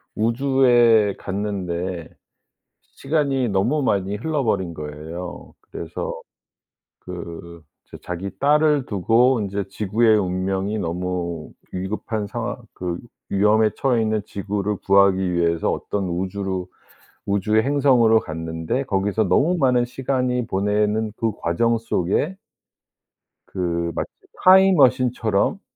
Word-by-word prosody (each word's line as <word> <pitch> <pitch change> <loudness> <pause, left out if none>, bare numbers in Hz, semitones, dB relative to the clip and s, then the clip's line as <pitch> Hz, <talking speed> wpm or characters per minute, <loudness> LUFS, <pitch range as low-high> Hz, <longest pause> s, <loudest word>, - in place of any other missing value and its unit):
우주에 120 -3 +3
갔는데 95 -4 -4 0.7
시간이 135 -3 -1
너무 110 +10 +1
많이 100 -4 0
흘러 145 +5 -2
버린 95 -6 -1
거예요. 80 +4 -8 0.2
그래서 - - -5 0.8
그 85 -2 -9 0.2
이제 - - -11
자기 90 +2 -4
딸을 150 -1 +3
두고 115 +6 +3
인제 100 -1 -3
지구의 110 +2 +2
운명이 95 +2 -1
너무 85 -2 -3 0.2
위급한 105 +3 -3
상황 115 +3 -4 0.2
그 90 -1 -4 0.3
위험에 105 +2 +3
처해 125 -4 +1
있는 110 -1 0
지구를 105 0 -3
구하기 95 -2 +4
위해서 85 -1 +1
어떤 100 -2 -3
우주로 95 +1 -3 0.6
우주의 105 +2 +1
행성으로 130 -5 +4
갔는데 80 - -3
거기서 105 -2 0
너무 165 - +2
많은 125 -5 +3
시간이 125 -1 -1
보내는 105 +2 0
그 115 -1 0
과정 115 +8 +1
속에 115 - -1 1.1
그 85 -2 -2
마치 - - -2 0.4
타임머신처럼 130 - +4
105 Hz, 245 characters per minute, -22 LUFS, 90-120 Hz, 1.1 s, 구하기